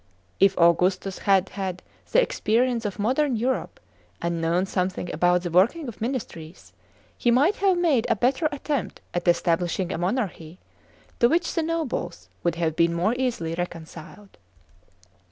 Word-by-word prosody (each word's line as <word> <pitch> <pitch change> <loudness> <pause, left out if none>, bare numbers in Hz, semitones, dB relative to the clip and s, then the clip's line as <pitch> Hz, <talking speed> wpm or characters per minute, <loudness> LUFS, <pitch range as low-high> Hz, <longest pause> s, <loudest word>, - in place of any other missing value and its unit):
If 195 0 +4
Augustus 180 +3 +2
had 190 -1 +4
had 190 -2 -5 0.3
the - - +5
experience 235 - 0
of 205 -1 -3
modern 255 +6 +1
Europe, 250 +4 -2 0.4
and 170 -1 -2
known 170 +3 +1
something 185 -1 -2
about 175 +2 +2
the 175 - -3
working 235 - +3
of 235 - -9
ministries, 205 -9 -6 0.4
he 240 - 0
might 280 - +3
have 390 -2 +2
made 315 -10 +2
a - - +3
better 260 +8 +1
attempt 285 -2 -3
at 175 0 -3
establishing 175 +1 +1
a - - -3
monarchy, 180 -4 -3 0.6
to 235 - +5
which 345 +3 +1
the 330 - 0
nobles 310 - -3
would 170 -1 0
have 165 -2 -1
been 170 0 +2
more 185 +7 +1
.easily 240 -11 -2
reconciled. 175 - -8
195 Hz, 150 wpm, -25 LUFS, 175-255 Hz, 0.6 s, the